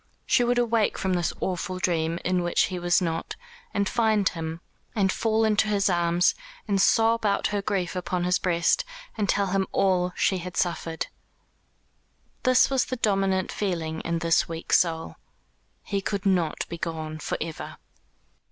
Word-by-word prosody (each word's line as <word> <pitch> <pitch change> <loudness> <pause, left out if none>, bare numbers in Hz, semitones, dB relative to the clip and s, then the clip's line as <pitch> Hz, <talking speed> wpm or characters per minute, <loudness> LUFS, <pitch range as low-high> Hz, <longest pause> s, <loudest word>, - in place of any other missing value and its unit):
She 255 -2 +3
would 240 0 +1
awake 230 -3 +2
from 190 -1 -1
this 175 -1 0
awful 185 0 -2
dream, 165 -2 0
in 180 0 +1
which 175 0 +2
he 180 - -2
was 175 +1 +2
not, 165 -1 -3 0.4
and 200 -1 0
find 220 -3 +2
him, 165 -1 -3 0.4
and 195 -3 +2
fall 220 +1 +1
into 215 0 +2
his 200 -2 +2
arms, 175 +1 +3 0.3
and 200 -2 +2
sob 225 +2 +3
out 200 -2 +1
her 205 - 0
grief 195 -3 -2
upon 180 0 -2
his 180 0 +2
breast, 170 -2 +2 0.3
and 205 -2 -1
tell 200 - +2
him 195 -1 +1
all 180 -2 +2
she 190 - +1
had 180 0 -7
suffered. 165 -2 -1 1.4
That 255 -1 +5
was 265 -2 +2
the 255 - -3
dominant 195 -4 +1
feeling 165 -5 -2
in 170 0 -1
this 165 0 +2
weak 165 0 -4
soul. 165 -2 +1 0.7
He 200 -2 -2
could 200 0 -3
not 180 -5 +1
be 170 - -7
gone 155 -2 -4
for - - -3
ever. 160 -1 -6
185 Hz, 165 wpm, -26 LUFS, 170-205 Hz, 1.4 s, That